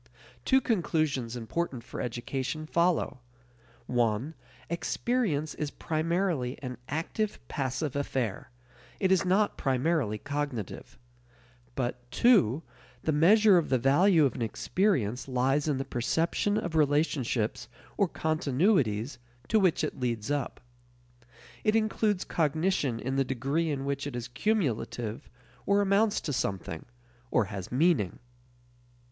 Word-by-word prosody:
Two 265 0 +4
conclusions 155 - 0
important 125 +2 -3
for - - -6
education 130 +5 -3
follow. 170 -4 +1 0.7
(1) 120 +4 0 0.3
Experience 170 - -1
is 150 - -3
primarily 160 -4 -1
an 125 -2 -5
active 180 +8 -2
passive 135 +1 -2
affair; 130 -7 -2 0.5
it 190 -1 +2
is 190 - +4
not 195 +3 +2
primarily 135 -4 +1
cognitive. 140 -4 -4 0.8
But 125 -1 -3
(2) 165 - +4 0.4
the 155 - +1
measure 190 +5 +6
of 165 - -3
the 130 - +3
value 155 - +4
of 130 - +1
an - - -6
experience 125 - 0
lies 135 +3 +1
in 145 -3 +1
the 135 - -3
perception 165 - 0
of 175 -6 -3
relationships 145 -7 +1 0.3
or 200 -4 +2
continuities 140 - +1 0.3
to 220 - +4
which 185 -5 +2
it 150 - -3
leads 120 -1 -2
up. 145 -3 -2 1.0
It 215 0 +2
includes 215 -3 +1
cognition 155 -5 0
in 130 +3 -2
the 135 - +4
degree 135 +6 -1
in 140 -2 -2
which 140 0 -2
it 145 - -6
is 120 -1 -4
cumulative 125 - -1 0.4
or 200 0 +4
amounts 205 +2 +3
to 145 - -3
something, 95 -8 -3 0.4
or 120 -4 +2
has 95 -3 -6
meaning. 135 - +2
145 Hz, 125 wpm, -29 LUFS, 125-175 Hz, 1.0 s, measure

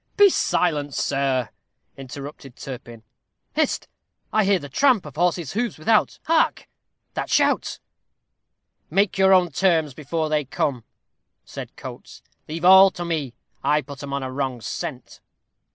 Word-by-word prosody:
"Be 405 -2 +7
silent, 150 - 0
sir," 135 -4 0 0.5
interrupted 135 0 -9
Turpin. 120 -5 -9 0.5
"Hist! - - 0 0.5
I 215 -2 +3
hear 200 0 +4
the 145 - -8
tramp 245 - +3
of 150 - -10
horses' 170 -3 0
hoofs 230 0 -2
without. 215 +8 +2
Hark! 325 0 +1 0.5
that - - -3
shout." - - +2 1.1
"Make 195 -1 +1
your 190 0 +5
own 180 -3 +5
terms 160 -4 +2
before 155 +3 -2
they 155 -1 +1
come," 130 -2 -2 0.6
said - - -9
Coates. - - -10 0.2
"Leave 165 +3 -4
all 190 +1 +9
to 175 -2 -6
me. 150 -8 -3 0.3
I'll 150 0 +2
put 140 +1 -10
'em 140 -1 -7
on 140 0 -2
a 130 - -4
wrong 130 -2 -2
scent." 110 - -6
150 Hz, 140 wpm, -23 LUFS, 135-190 Hz, 1.1 s, all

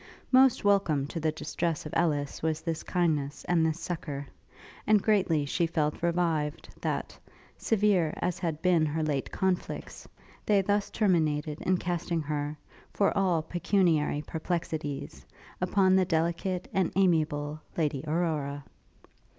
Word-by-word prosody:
Most 260 -1 +5
welcome 195 -9 +3
to 165 - -4
the 155 0 +1
distress 155 +1 -3
of 150 - -7
Ellis 145 -4 0
was 160 0 -1
this 165 -1 -3
kindness 150 -5 -1
and 170 -2 +2
this 160 +1 0
succour; 155 -5 -4 0.6
and 215 -1 +6
greatly 185 -8 +2
she 170 +4 0
felt 155 -2 -1
revived, 165 -3 0
that, - - -2 0.4
severe 200 -7 +2
as 180 0 -2
had 165 -4 -3
been 175 -3 +4
her 155 +2 -1
late 145 -3 -1
conflicts, 190 -1 -2 0.4
they 200 -2 +4
thus 205 +1 0
terminated 155 -7 +1
in 185 0 +2
casting 175 -2 -2
her, 150 0 -3 0.3
for 200 - +1
all 180 -5 +2
pecuniary 170 -5 +1
perplexities, 155 -4 -4 0.4
upon 185 +1 +3
the 190 - +5
delicate 170 +2 -1
and 190 -3 +1
amiable 155 -5 +1 0.2
Lady 145 -5 0
Aurora. 150 -3 -1
165 Hz, 135 wpm, -29 LUFS, 150-180 Hz, 0.6 s, and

